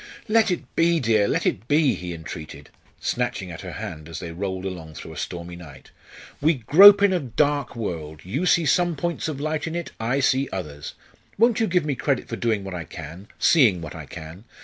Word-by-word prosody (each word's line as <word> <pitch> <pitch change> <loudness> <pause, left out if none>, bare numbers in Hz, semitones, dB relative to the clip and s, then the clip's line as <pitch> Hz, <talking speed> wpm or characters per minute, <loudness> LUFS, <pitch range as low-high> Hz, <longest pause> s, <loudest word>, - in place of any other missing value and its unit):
"Let 220 0 +3
it 180 - -4
be, 170 0 +3
dear, 110 -5 +2
let - - 0
it 110 - -1
be!" 145 -1 +3
he 90 -1 -6
entreated, 80 -3 -9 0.3
snatching 95 -2 -2
at 85 - -8
her 90 -3 -7
hand 75 0 -7
as 80 - -6
they 85 -2 -6
rolled 95 +2 -4
along 80 -5 -6
through - - -9
a - - -12
stormy 85 0 -6
night. 80 -6 -13 0.5
"We 155 +3 +3
grope 195 - +8
in 200 -2 +4
a 180 - +2
dark 145 0 0
world 80 -9 -5
you 140 - -1
see 170 -2 +4
some 175 +3 +2
points 170 +3 -2
of 150 -3 -4
light 155 +1 -2
in 165 - -4
it, 170 -1 -4
I 120 +5 0
see 135 0 +2
others 75 -6 -6 0.4
won't 235 +2 +4
you 225 - +2
give 180 -4 +1
me 145 - 0
credit 135 0 -1
for - - -4
doing 110 -4 -1
what 95 -1 -6
I 85 -2 -4
can 80 +4 -10
seeing 120 - +4
what 80 -3 -7
I - - -9
can? 80 +7 -10
115 Hz, 215 wpm, -24 LUFS, -, 0.5 s, grope